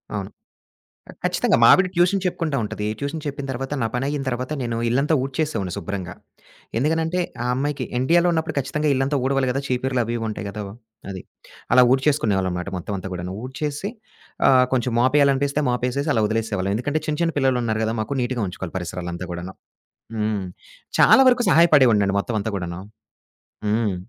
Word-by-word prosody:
అవును. - - -4 0.8
ఆహ్, - - -16
ఖచ్చితంగా. - - +2
మా - - +8
ఆవిడ 190 -1 +2
ట్యూషన్ 180 +3 +3
చెప్పుకుంటా 165 -5 -1
ఉంటది. 105 0 -4
ట్యూషన్ 145 +2 -4
చెప్పిన 140 -1 -4
తర్వాత, 135 +3 -5
నా 115 - +2
పనయ్యిన 135 +3 -1
తర్వాత 130 +3 -3
నేను 115 -1 -2
ఇళ్లంతా 140 +6 +2
ఊడ్చేసేవోడిని 135 - -2
శుభ్రంగా. 90 -1 -5 0.6
ఎందుకనంటే, 160 +6 0 0.2
ఆ - - -3
అమ్మాయికి 145 +2 -2
ఇండియాలో 170 +6 +3
ఉన్నప్పుడు 160 -1 -1
ఖచ్చితంగా 150 +3 -1
ఇళ్ళంతా 135 +2 0
ఊడవాలి 135 -1 +1
గదా! 135 +2 -2
చీపుర్లు 130 0 0
అవీవుంటాయి 115 -2 -3
గదా! 105 +1 -6 0.5
అది. 95 -2 -6 0.5
అలా 125 - +8
ఊడ్చేసుకునేవాళ్ళంమాట 100 -10 +1
మొత్తవంతా 95 +1 -5
గూడాను. 90 0 -5
ఊడ్చేసి 145 +7 -4 0.6
ఆహ్, 130 -1 +6
కొంచెం 125 0 0
మాపేయాలనిపిస్తే 140 +2 +3
మాపేసేసి 125 +4 -1
అలా 115 - +2
ఒదిలేసేసేవాళ్ళం. 105 -3 -1
ఎందుకంటే, 145 +7 -1
చిన్న 150 -1 -1
చిన్న 165 -1 +1
పిల్లలున్నారు 125 -5 +1
గదా 110 +1 0
మాకు, 110 - -3
నీటుగా 120 -2 -1
ఉంచుకోవాలి 90 -1 -7
పరిసరాలంతా 90 0 -5
గూడాను. 85 +2 -6 0.6
హ్మ్. 105 -2 -1 0.6
చాలా 270 - +7
వరకు 245 -1 +3
సహాయపడేవోడినండి 125 - +5
మొత్తవంతా 110 0 -2
గూడాను. 90 -1 -5 0.9
హ్మ్. 105 -2 +1
125 Hz, 145 wpm, -22 LUFS, 105-145 Hz, 0.9 s, మా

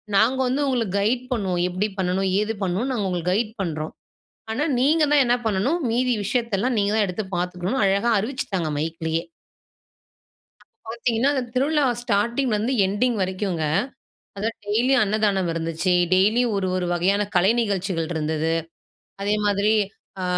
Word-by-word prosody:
நாங்க 225 +6 +4
வந்து 260 +3 0
உங்களுக்கு 230 -7 -1
கைடு 240 +5 0
பண்ணுவோம். 190 -6 -1
எப்படி 185 +4 -1
பண்ணணும், 190 +1 0
ஏது 215 +1 -1
பண்ணணும்னு 195 +8 -1
நாங்க 210 -5 -1
உங்களுக்கு 180 -1 -1
கைடு 215 +2 -1
பண்றோம். 155 -4 -3 0.6
ஆனா 260 +7 0 0.2
நீங்க 305 +5 +3
தான் 290 -1 +6
என்ன 240 +1 +3
பண்ணணும் 220 - +1
மீதி 250 +2 +1
விஷயத்தெல்லாம் 235 +1 0
நீங்க 200 0 +1
தான் 215 -2 +3
எடுத்து 190 +3 -4
பார்த்துக்கணும் 180 +6 -2
அழகா 200 +4 +2
அறிவிச்சுட்டாங்க 200 - -2
மைக்லயே. 160 +1 -2 1.4
அப்ப 225 - -17
பார்த்தீங்கன்னா 235 +2 +1
அந்த 265 -3 0
திருவிழா 290 +3 +2 0.2
ஸ்டார்ட்டிங்லருந்து 235 +2 0
எண்டிங் 220 +5 0
வரைக்கும்ங்க, 185 -3 -1 0.7
அதாவது 225 +3 -2
டெய்லியும் 245 +4 +3
அன்னதானம் 200 -3 +1
இருந்துச்சு. 165 +2 -1 0.2
டெய்லியும் 215 +5 +3
ஒரு 190 -1 -1
ஒரு 180 - -1
வகையான 190 +4 +2
கலை 185 +4 +5
நிகழ்ச்சிகள் 190 -6 -1
இருந்தது. 160 +1 -1 0.7
அதே 205 +1 +1
மாரி 205 +1 +2 0.5
அ - - -2
205 Hz, 140 wpm, -23 LUFS, 185-240 Hz, 1.4 s, தான்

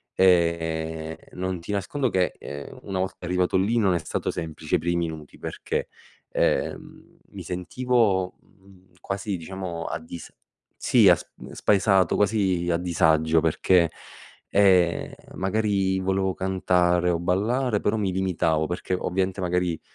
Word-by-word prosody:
E 80 -3 +1 0.2
non 95 0 -3
ti 85 - -6
nascondo 110 +7 -1
che, 90 -4 +1
ehm, 70 0 -8
una 95 -1 -3
volta 95 -1 -4
arrivato 90 +1 +1
lì, 105 +6 +1
non 95 -5 +3
è - - +1
stato 75 - -3
semplice 80 -1 -3
i - - +2
primi 85 0 -1
minuti 75 -2 -10
perché, - - -3 0.4
ehm, - - -2
mi - - -8
sentivo 95 0 0 0.7
quasi 100 0 -3
diciamo 85 -1 -6
a - - -3
dis 80 +1 -10 0.4
Sì - - +5
sp - - -4 0.3
spaesato, 95 -2 +3
quasi 95 -4 +1
a 85 - +2
disagio, 80 -2 +2
perché, 85 +1 +3 0.6
ehm, 95 -4 +3 0.3
magari 95 -1 0
volevo 95 0 0
cantare 90 -2 +1
o 85 - +2
ballare 105 +7 +1
però 105 - +1
mi 100 -3 0
limitavo 85 -4 0
perché 90 +2 -3
ovviamente 95 +1 -1
magari, 90 -2 0
90 Hz, 130 wpm, -25 LUFS, 85-95 Hz, 0.7 s, Sì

